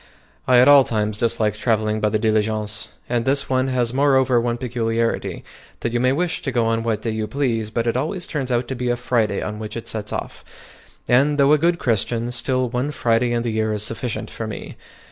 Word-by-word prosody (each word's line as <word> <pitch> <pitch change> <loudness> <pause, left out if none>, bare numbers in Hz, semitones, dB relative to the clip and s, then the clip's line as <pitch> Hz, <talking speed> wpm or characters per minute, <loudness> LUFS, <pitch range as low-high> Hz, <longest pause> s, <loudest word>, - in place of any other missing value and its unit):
I 125 - +5
at 125 +2 +6
all 145 -1 +8
times 105 -3 -2
dislike 110 -2 +2
travelling 110 -1 0
by 105 - +1
the 110 - +1
diligence, 110 -1 0 0.2
and 120 -1 0
this 140 +1 0
one 130 0 +2
has 125 -2 0
moreover 130 -3 +3
one 120 0 -1
peculiarity, 115 -2 -2 0.4
that 115 - -2
you 120 - +1
may 130 +1 +3
wish 170 +5 -1
to 135 - -3
go 120 -2 +1
on 115 0 +1
what 110 -2 -2
day 115 - -1
you 110 0 -3
please, 115 -3 -1
but 115 +1 -2
it 115 - 0
always 160 +7 -2
turns 135 -5 -3
out 120 0 0
to 130 - -3
be 125 0 -2
a 120 - +2
Friday 120 -3 0
on 105 0 -5
which 110 +1 -6
it 115 - -7
sets 105 -1 -4
off; - - -5 0.6
and 140 +4 +3
though 140 +1 +5
a 150 - +4
good 170 +2 +2
Christian, 115 - 0
still 130 +1 0
one 125 +4 -2
Friday 120 -4 +1
in 120 0 0
the 120 - -2
year 110 0 0
is 105 -1 0
sufficient 115 +1 -3
for - - -5
me. - - -7
120 Hz, 220 wpm, -21 LUFS, 110-130 Hz, 0.6 s, all